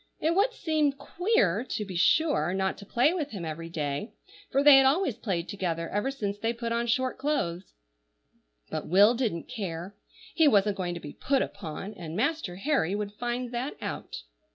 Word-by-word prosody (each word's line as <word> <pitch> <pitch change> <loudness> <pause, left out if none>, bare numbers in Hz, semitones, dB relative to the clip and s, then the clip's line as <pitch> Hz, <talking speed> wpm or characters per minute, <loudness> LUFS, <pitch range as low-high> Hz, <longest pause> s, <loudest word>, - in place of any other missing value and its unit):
It 320 +2 +1
would 405 +6 +3
seem 305 -3 +1
queer, 275 - +1
to 215 -4 -4
be 190 -2 -7
sure, 180 - +3
not 190 0 0
to 200 - -11
play 255 +10 +3
with 310 -6 -2
him 190 -9 -6
every 165 +1 -5
day, 150 - -3 0.4
for 275 +1 +2
they 290 -2 +9
had 270 - +6
always 285 - +2
played 180 -5 -3
together 170 -4 -2
ever 205 +6 -1
since 205 -7 -3
they 225 +2 0
put 235 0 -4
on 235 +1 0
short 255 +3 0
clothes; 200 - -2 1.0
but - - -3
Will 200 +6 +6
didn't 230 -9 -2
care. 185 -1 -5 0.4
He 320 -2 +5
wasn't 205 -4 +3
going 175 -2 -2
to - - -5
be 145 -3 -9
"put 275 0 +1
upon," 190 +2 -7
and 165 -4 -7
Master 275 - -1
Harry 200 - 0
would 205 -1 -3
find 240 +2 -3
that 255 - -3
out. - - -6
210 Hz, 185 wpm, -28 LUFS, 180-275 Hz, 1.0 s, they